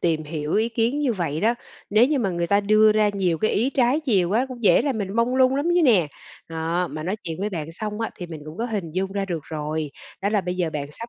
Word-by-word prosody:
tìm 160 -3 0
hiểu 150 0 -4
ý 220 +2 +2
kiến 235 +4 0
như 275 -5 +1
vậy 165 -7 -2
đó, 230 +3 +3 0.4
nếu 215 +4 +5
như 295 -1 +1
mà 210 -6 0
người 170 -1 -1
ta 200 +3 +3
đưa 215 +1 +5
ra 215 -1 +3
nhiều 185 -5 0
cái 215 - +1
ý 240 +6 +1
trái 265 +2 +2
chiều 200 - +2
quá 225 +6 +2
cũng 250 -2 -9
dễ 205 - +5
làm 270 -6 -1
mình 195 -2 -3
mông 235 +2 +2
lung 260 0 +4
lắm 285 - 0
chứ 355 - +4
nè. 210 - +4 0.4
Đó, 165 +2 -1
mà 155 - -5
nói 185 +6 -2
chuyện 165 -2 -4
với 210 - -1
bạn 165 -4 -5
xong 210 +4 -5
á 225 - -2
thì 175 - -6
mình 160 -3 -8
cũng 155 +3 -9
có 230 - -1
hình 200 -8 -3
dung 190 +1 -2
ra 200 -1 -1
được 175 -5 -3
rồi, 155 -1 -3 0.3
đó 200 - +2
là 210 -1 +2
bây 180 0 -4
giờ 170 -3 0
bạn 145 -2 -4
sắp 230 +7 -8
200 Hz, 280 wpm, -23 LUFS, 165-230 Hz, 0.4 s, nếu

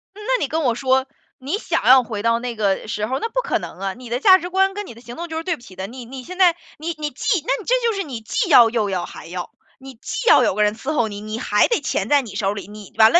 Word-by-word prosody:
嗯， - - -12
那 - - +1
你 - - 0
跟 315 +2 -1
我 240 -3 +2
说， 260 +2 +1 0.3
你 270 +6 -6
想 - - -2
要 260 0 +7
回 215 -3 -5
到 230 +1 +2
那 245 -1 -4
个 205 -1 0
时 210 0 -2
候， 260 +4 -2
那 455 - -3
不 - - 0
可 - - -1
能 - - -9
啊， 195 -1 -2
你 245 -1 -11
的 245 - -1
价 375 +5 +7
值 355 0 -6
观 385 +1 +2
跟 415 0 -5
你 - - -10
的 230 - -15
行 240 0 -10
动 340 +1 -5
就 320 - -4
是 325 - -3
对 355 -1 -1
不 295 - -20
齐 190 -6 -14
的。 190 +1 -5
你 245 +1 -9
你 260 +2 -9
现 365 +5 -9
在 360 -3 +5 0.2
你 315 +2 -8
你 300 -1 -3
既 345 - 0
那 440 - 0
这 - - +2
就 455 - +1
是 390 - -2
你 265 -7 -6
既 355 - -1
要、 240 -5 +8
又 220 -3 0
要、 185 -2 -2
还 - - -11
要， 175 +1 -6 0.3
你 270 0 -11
既 465 - -5
要 - - +7
有 - - +2
个 210 +1 +2
人 210 +1 +1
伺 270 +7 -4
候 240 -6 +1
你， 205 0 -7
你 215 +1 -5
还 210 -3 +3
得 470 - +1
钱 - - -2
在 290 -1 +5
你 225 -6 -10
手 195 -1 0
里， 200 -2 -7
你 210 -2 -12
完 220 0 +7
了， 345 - +8
250 Hz, 335 characters per minute, -21 LUFS, 215-330 Hz, 0.3 s, 要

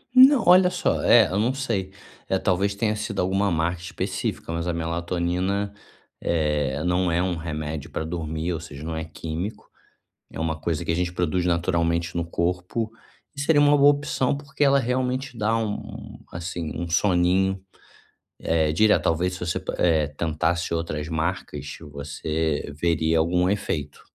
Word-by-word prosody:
Não, 260 0 +8
olha 180 +1 +7
só, 180 - 0
é, 115 -4 +7
eu 95 - 0
não 120 +5 +2
sei. 115 -9 -2 0.4
É 95 - +1
talvez 100 +1 +1
tenha 105 +1 0
sido 105 -1 -2
alguma 95 +2 +1
marca 85 +1 0
específica, 90 -2 -3
mas 85 0 -2
a 90 - 0
melatonina, 85 +4 -1 0.5
eh, 75 -3 0
não 90 0 +1
é 85 +1 +2
um 90 -1 0
remédio 75 -2 -5
pra - - -3
dormir, 80 +1 -3
ou 80 - -3
seja, 75 -3 -9
não 80 0 -4
é 80 0 -3
químico, 80 +5 -6 0.6
é - - -7
uma 80 -1 -1
coisa 80 0 -2
que - - 0
a - - +1
gente 90 0 -1
produz 90 0 0
naturalmente 85 -1 0
no 85 -1 -1
corpo 90 +6 -2 0.5
e 140 - -4
seria 145 +1 +4
uma 145 0 +5
boa 140 0 +7
opção 140 -2 0
porque 140 0 -3
ela 140 0 +5
realmente 130 +1 -1
dá 110 +1 +1
um, 110 -2 -5
assim, 85 -1 -4
um 85 - -3
soninho, 95 +1 +2 0.8
eh, 80 -2 +1
direto 105 +6 +4
talvez 90 +3 +1
se - - -8
você, 85 -1 -2 0.2
eh, 80 -4 +3
tentasse 85 +2 0
outras 80 -2 -2
marcas 80 +2 -3
você 75 +2 -2
veria 80 -1 +2
algum 90 +2 +2
efeito. 75 -8 -3
85 Hz, 160 wpm, -24 LUFS, 80-100 Hz, 0.8 s, Não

